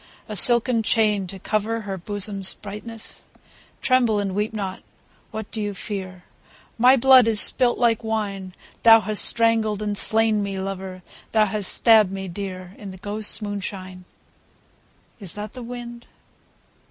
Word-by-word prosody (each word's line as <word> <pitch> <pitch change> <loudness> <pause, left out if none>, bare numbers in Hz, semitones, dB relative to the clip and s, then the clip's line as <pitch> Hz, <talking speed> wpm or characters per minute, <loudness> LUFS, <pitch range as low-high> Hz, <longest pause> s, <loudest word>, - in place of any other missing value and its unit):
A 215 - -7
silken 235 +3 +4
chain, 210 -3 0
to 195 +2 -10
cover 215 +3 -3
Her 200 -2 -6
bosom's 200 +1 -1
brightness? 215 +2 -8 0.6
(Tremble 245 -4 +2
and 200 -2 -3
weep 210 +2 -2
not: 195 -3 -6 0.5
what 220 -1 -8
dost 220 - -4
thou 205 0 -4
fear 185 -2 -8 0.2
?) - - -29
— - - -33
My 250 +3 +5
blood 260 -1 +5
is 220 -2 +4
spUt 245 +2 +7
like 235 -2 0
wine, 200 -4 -5 0.3
Thou 225 -1 +6
hast 215 0 0
strangled 225 -2 +2
and 205 -1 -3
slain 220 0 +1
me, 200 -1 -5
lover. 190 -1 -7 0.3
Thou 215 -1 +3
hast 205 -1 0
stabbed 220 -4 +4
me 195 0 -6
dear. 185 0 -8
In 205 - -9
the 190 - -11
ghosts' 210 +3 -1
moonshine. 185 -2 -7 1.1
Is 195 -6 -9
that 210 +1 -8
the 255 - -9
wind 240 0 -10
210 Hz, 155 wpm, -22 LUFS, 195-225 Hz, 1.1 s, spUt